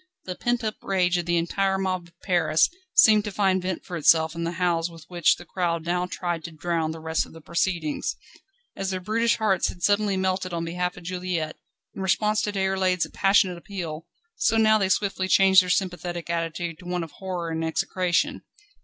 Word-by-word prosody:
The 185 Hz, -, -4 dB
pent 240 Hz, +5 st, -1 dB
up 215 Hz, -1 st, -2 dB
rage 180 Hz, -2 st, +1 dB
of 175 Hz, -, -4 dB
the 175 Hz, 0 st, +2 dB
entire 190 Hz, +3 st, 0 dB
mob 185 Hz, -2 st, -2 dB
of 170 Hz, -, -24 dB
Paris 170 Hz, -, +3 dB, 0.2 s
seemed 215 Hz, -3 st, +6 dB
to 210 Hz, -, -3 dB
find 190 Hz, -1 st, +1 dB
vent 180 Hz, -1 st, -4 dB
for 180 Hz, -, -6 dB
itself 160 Hz, 0 st, +4 dB
in 170 Hz, 0 st, -3 dB
the 170 Hz, -, -2 dB
howls 175 Hz, -1 st, 0 dB
with 165 Hz, -2 st, -13 dB
which 175 Hz, -3 st, +3 dB
the 175 Hz, -, -12 dB
crowd 170 Hz, -2 st, -2 dB
now 180 Hz, +1 st, 0 dB
tried 175 Hz, -3 st, -3 dB
to 170 Hz, -, -6 dB
drown 160 Hz, 0 st, -2 dB
the 160 Hz, 0 st, -6 dB
rest 160 Hz, 0 st, -1 dB
of -, -, -16 dB
the 165 Hz, -, -11 dB
proceedings. 170 Hz, -1 st, -1 dB, 0.6 s
As 195 Hz, -1 st, -3 dB
their 185 Hz, -1 st, -2 dB
brutish 225 Hz, +5 st, +1 dB
hearts 205 Hz, -5 st, +1 dB
had -, -, -6 dB
been -, -, -21 dB
suddenly 205 Hz, -1 st, +2 dB
melted 185 Hz, -1 st, -1 dB
on 165 Hz, 0 st, -2 dB
behalf 180 Hz, +1 st, -2 dB
of 180 Hz, -, -11 dB
Juliette, 180 Hz, -3 st, -3 dB, 0.4 s
in -, -, -7 dB
response 210 Hz, +3 st, +1 dB
to 210 Hz, -, -1 dB
Déroulède's 190 Hz, -2 st, +1 dB
passionate 195 Hz, -3 st, +3 dB
appeal, 170 Hz, -4 st, -6 dB, 0.3 s
so 225 Hz, -, +2 dB
now 215 Hz, -1 st, +5 dB
they 195 Hz, -2 st, +1 dB
swiftly 195 Hz, -1 st, 0 dB
changed 190 Hz, 0 st, +6 dB
their 180 Hz, -, -5 dB
sympathetic 175 Hz, -2 st, -2 dB
attitude 165 Hz, 0 st, -3 dB
to 180 Hz, -, -13 dB
one 180 Hz, -1 st, -2 dB
of 165 Hz, -, -9 dB
horror 180 Hz, -3 st, -5 dB
and 160 Hz, 0 st, -2 dB
execration. 175 Hz, +2 st, 0 dB
180 Hz, 205 wpm, -25 LUFS, 170-190 Hz, 0.6 s, seemed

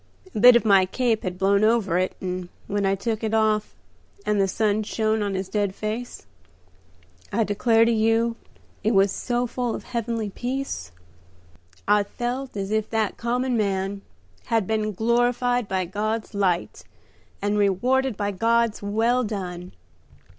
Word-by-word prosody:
A -, -, -2 dB
bit 245 Hz, +2 st, +9 dB
of 235 Hz, -, +3 dB
my 195 Hz, -3 st, +5 dB
cape 230 Hz, +2 st, 0 dB
had 180 Hz, -1 st, -4 dB
blown 200 Hz, +2 st, +3 dB
over 215 Hz, -5 st, +2 dB
it, 185 Hz, -, -1 dB
and 180 Hz, -1 st, -4 dB, 0.2 s
when 200 Hz, -1 st, -1 dB
I 195 Hz, -, +2 dB
took 220 Hz, +2 st, -3 dB
it 220 Hz, 0 st, 0 dB
off 215 Hz, -1 st, +1 dB, 0.5 s
and 210 Hz, -1 st, +2 dB
the 195 Hz, -, +2 dB
sun 210 Hz, +2 st, +1 dB
shone 220 Hz, 0 st, 0 dB
on 200 Hz, -2 st, -1 dB
his 190 Hz, 0 st, -3 dB
dead 200 Hz, -1 st, -1 dB
face, 220 Hz, +3 st, -5 dB, 1.1 s
I 225 Hz, +2 st, +2 dB
declare 225 Hz, +2 st, +3 dB
to 235 Hz, -, +2 dB
you 225 Hz, +1 st, +2 dB, 0.5 s
it 220 Hz, 0 st, +2 dB
was 195 Hz, 0 st, +4 dB
so 245 Hz, +3 st, -1 dB
full 245 Hz, -1 st, -2 dB
of -, -, -7 dB
heavenly 230 Hz, -3 st, -3 dB
peace 245 Hz, -, -4 dB, 1.0 s
I 205 Hz, 0 st, +5 dB
felt 245 Hz, +4 st, -4 dB
as 195 Hz, 0 st, -3 dB
if 220 Hz, 0 st, 0 dB
that 220 Hz, -2 st, -1 dB
common 245 Hz, +2 st, -1 dB
man 195 Hz, -2 st, -1 dB, 0.4 s
had 225 Hz, -4 st, +1 dB
been 215 Hz, +1 st, -1 dB
glorified 245 Hz, +2 st, +1 dB
by 190 Hz, -1 st, -1 dB
God's 215 Hz, +4 st, -3 dB
light, 185 Hz, -4 st, -1 dB, 0.6 s
and 205 Hz, +1 st, 0 dB
rewarded 245 Hz, +5 st, +1 dB
by 205 Hz, 0 st, -1 dB
God's 230 Hz, +2 st, +1 dB
'Well 225 Hz, +5 st, +1 dB
done.' 180 Hz, -5 st, -5 dB
215 Hz, 155 wpm, -24 LUFS, 195-235 Hz, 1.1 s, bit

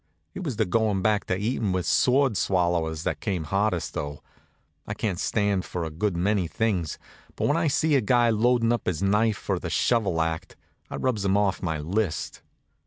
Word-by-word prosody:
It -, -, -6 dB
was 140 Hz, -8 st, -3 dB
the 110 Hz, 0 st, +1 dB
goin' 100 Hz, 0 st, +1 dB
back 105 Hz, -1 st, +2 dB
to 90 Hz, -, -1 dB
eatin' 105 Hz, -1 st, -1 dB
with 90 Hz, -1 st, -1 dB
sword 130 Hz, -2 st, +3 dB
swallowers 85 Hz, -4 st, 0 dB
that -, -, -2 dB
came 95 Hz, -6 st, -2 dB
hardest, 95 Hz, +2 st, -1 dB
though. 70 Hz, 0 st, -5 dB, 0.6 s
I -, -, -4 dB
can 100 Hz, -5 st, -1 dB
stand 100 Hz, -1 st, 0 dB
for 90 Hz, -1 st, -4 dB
a 80 Hz, -, -4 dB
good 85 Hz, +3 st, -1 dB
many 95 Hz, 0 st, +1 dB
things, 95 Hz, -5 st, -1 dB, 0.4 s
but -, -, 0 dB
when 145 Hz, -, +2 dB
I 165 Hz, -1 st, +1 dB
sees 150 Hz, +1 st, +2 dB
a -, -, +2 dB
guy 120 Hz, +1 st, +3 dB
loadin' 115 Hz, +1 st, +3 dB
up 120 Hz, -, -3 dB
his 90 Hz, +1 st, -1 dB
knife 105 Hz, +2 st, +2 dB
for -, -, -2 dB
the -, -, -5 dB
shovel 105 Hz, -8 st, +1 dB
act, 80 Hz, 0 st, -2 dB, 0.3 s
I -, -, -5 dB
rubs 120 Hz, -6 st, -1 dB
him 100 Hz, 0 st, +2 dB
off 100 Hz, -2 st, +1 dB
my 80 Hz, -4 st, -1 dB
list. 90 Hz, +4 st, -2 dB
100 Hz, 195 wpm, -26 LUFS, 90-115 Hz, 0.6 s, sword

